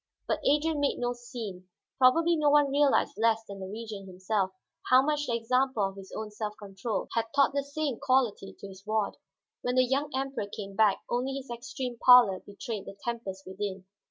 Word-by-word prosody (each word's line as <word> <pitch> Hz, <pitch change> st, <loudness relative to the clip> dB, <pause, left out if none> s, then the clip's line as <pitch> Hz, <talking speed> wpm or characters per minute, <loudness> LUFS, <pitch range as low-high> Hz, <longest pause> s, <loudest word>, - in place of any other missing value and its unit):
But -, -, 0 dB
Adrian 300 Hz, +2 st, +2 dB
made 285 Hz, -1 st, +1 dB
no 245 Hz, 0 st, -1 dB
scene. 230 Hz, -7 st, -8 dB, 0.3 s
Probably 330 Hz, +7 st, +5 dB
no 300 Hz, -2 st, +3 dB
one 290 Hz, -1 st, +4 dB
realized 285 Hz, -4 st, +2 dB
less 225 Hz, 0 st, +3 dB
than 200 Hz, -2 st, -9 dB
the 190 Hz, -, -6 dB
Regent 210 Hz, -1 st, -7 dB
himself 190 Hz, +1 st, -1 dB, 0.4 s
how 255 Hz, +1 st, +7 dB
much 295 Hz, 0 st, 0 dB
the 235 Hz, -, 0 dB
example 250 Hz, 0 st, +1 dB
of 195 Hz, 0 st, -2 dB
his 195 Hz, -1 st, -11 dB
own 215 Hz, -1 st, -5 dB
self 210 Hz, 0 st, -5 dB
control 205 Hz, +2 st, -4 dB
had 230 Hz, -1 st, +1 dB
taught 280 Hz, -1 st, +4 dB
the 280 Hz, -, +1 dB
same 280 Hz, -3 st, -3 dB
quality 255 Hz, -8 st, +1 dB
to -, -, -9 dB
his 190 Hz, 0 st, -13 dB
ward. 215 Hz, -1 st, -1 dB, 0.4 s
When 245 Hz, 0 st, -1 dB
the 255 Hz, 0 st, +5 dB
young 275 Hz, +3 st, 0 dB
Emperor 270 Hz, -5 st, -2 dB
came 200 Hz, -1 st, -8 dB
back, 210 Hz, -1 st, +3 dB
only 250 Hz, +3 st, -1 dB
his 270 Hz, -2 st, -7 dB
extreme 240 Hz, 0 st, -5 dB
pallor 245 Hz, -7 st, +8 dB
betrayed 205 Hz, 0 st, -7 dB
the 195 Hz, -, -9 dB
tempest 200 Hz, -5 st, -5 dB
within. 190 Hz, 0 st, -5 dB
235 Hz, 190 wpm, -29 LUFS, 200-270 Hz, 0.4 s, pallor